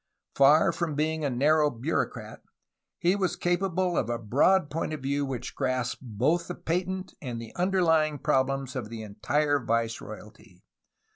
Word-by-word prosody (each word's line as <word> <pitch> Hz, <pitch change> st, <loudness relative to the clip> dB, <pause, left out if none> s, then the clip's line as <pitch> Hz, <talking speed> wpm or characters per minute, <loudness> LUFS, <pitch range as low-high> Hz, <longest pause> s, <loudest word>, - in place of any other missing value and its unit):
Far 140 Hz, +3 st, +5 dB
from 165 Hz, -4 st, -3 dB
being 155 Hz, +1 st, -1 dB
a 145 Hz, -, +1 dB
narrow 150 Hz, +4 st, +3 dB
bureaucrat, 135 Hz, +5 st, -3 dB, 0.6 s
he 180 Hz, +3 st, +2 dB
was 190 Hz, -3 st, 0 dB
capable 175 Hz, 0 st, 0 dB
of 115 Hz, -, 0 dB
a 120 Hz, -, -1 dB
broad 145 Hz, -, +2 dB
point 160 Hz, 0 st, -2 dB
of 155 Hz, -, -5 dB
view 140 Hz, +1 st, 0 dB
which 130 Hz, -3 st, -5 dB
grasped 130 Hz, -1 st, -2 dB
both 130 Hz, +8 st, 0 dB
the 180 Hz, -, -5 dB
patent 185 Hz, +3 st, -3 dB
and 120 Hz, -4 st, -5 dB
the 115 Hz, -1 st, -9 dB
under 185 Hz, +1 st, +1 dB
lying 155 Hz, -2 st, +3 dB
problems 135 Hz, -2 st, 0 dB
of 120 Hz, -5 st, -4 dB
the 115 Hz, -1 st, -7 dB
entire 145 Hz, +8 st, 0 dB
viceroyalty. 110 Hz, -4 st, -4 dB
145 Hz, 155 wpm, -27 LUFS, 120-165 Hz, 0.6 s, Far